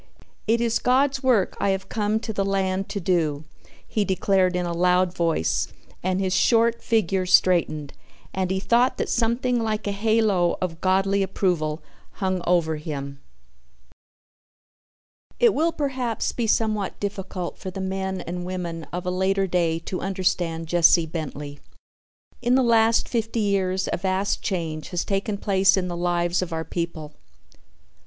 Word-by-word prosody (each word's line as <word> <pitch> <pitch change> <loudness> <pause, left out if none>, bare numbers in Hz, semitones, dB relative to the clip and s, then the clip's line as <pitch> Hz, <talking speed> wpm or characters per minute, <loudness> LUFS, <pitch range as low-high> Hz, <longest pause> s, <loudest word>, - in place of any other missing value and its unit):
"It 230 +2 +3
is 230 -1 +1
God's 265 +2 +2
work 245 -8 +2
I 200 - +1
have 190 0 -1
come 215 +1 0
to 220 - -4
the 200 - 0
land 195 -1 -1
to 200 - -3
do," 165 -5 0 0.4
he 215 - 0
declared 190 -1 +1
in 180 0 0
a 170 - -2
loud 180 +1 +2
voice 165 - 0 0.3
and 185 +1 0
his 190 -1 0
short 230 +3 +3
figure 190 -4 +1
straightened 170 -6 +3 0.4
and 185 -1 -1
he 190 0 0
thought 240 +5 +2
that - - -2
something 240 +1 +1
like 215 -1 -2
a 205 - -1
halo 205 -4 +2
of 165 -3 -4
Godly 195 +1 +2
approval 175 -5 -1 0.3
hung 185 -2 -1
over 165 -3 +2
him. 140 -3 -6 2.2
It 475 -3 +5
will 325 +3 +1
perhaps 260 -7 -2
be 235 -2 -2
somewhat 215 -2 0
difficult 195 -3 -5
for 190 - -5
the 185 - -7
men 190 0 -3
and 175 +1 -5
women 175 -3 -5
of 180 +1 -4
a 180 - 0
later 190 +1 +1
day 170 -3 +1
to 185 +2 -5
understand 180 -3 -1
Jesse 170 0 +4
Bentley. 150 -3 -6 0.8
In 245 +1 +2
the 265 - +4
last 230 -1 +3
fifty 225 -1 -2
years 190 -2 0
a - - 0
vast 190 +2 -1
change 160 -5 -3
has 175 -1 -2
taken 200 +1 -1
place 195 -1 +3
in 180 -1 -1
the 175 - -4
lives 175 0 0
of 180 -1 -4
our 160 0 -3
people. 165 -3 -4
190 Hz, 155 wpm, -24 LUFS, 175-210 Hz, 2.2 s, It